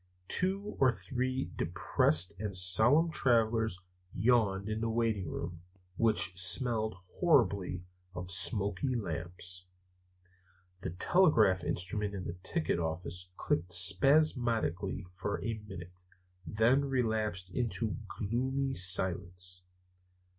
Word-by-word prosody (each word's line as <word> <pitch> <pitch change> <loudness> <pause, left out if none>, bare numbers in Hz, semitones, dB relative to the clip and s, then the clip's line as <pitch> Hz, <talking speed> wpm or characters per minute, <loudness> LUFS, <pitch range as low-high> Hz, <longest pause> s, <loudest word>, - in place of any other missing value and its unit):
Two 195 +3 -2
or 130 -2 +5
three 130 +2 -3
depressed 85 +5 +1
and 105 -2 -4
somnolent 110 - +5
travelers 110 -4 +2 0.4
yawned 100 -2 +1
in 110 +1 -3
the 115 - -1
waiting 110 -6 -1
room, 85 0 -6 0.3
which 95 -5 +2
smelled 110 +3 +1 0.2
horribly 100 - +1 0.3
of 90 0 -6
smoky 100 +6 0
lamps. 90 -2 -5 1.2
The - - -4
telegraph 105 - +3
instrument 100 +4 -3
in 95 - -5
the 85 - -4
ticket 155 - -1
office 85 +2 -3
clicked 90 +3 -2
spasmodically 110 - +2
for 100 +2 -3
a 115 - -3
minute, 90 -1 -11 0.4
and 80 - -7
then 120 +6 +3
relapsed 110 -8 -2
into 115 -3 -2
a - - -5 0.3
gloomy 130 +5 -1
silence. 90 -1 +2
100 Hz, 110 wpm, -31 LUFS, 90-120 Hz, 1.2 s, or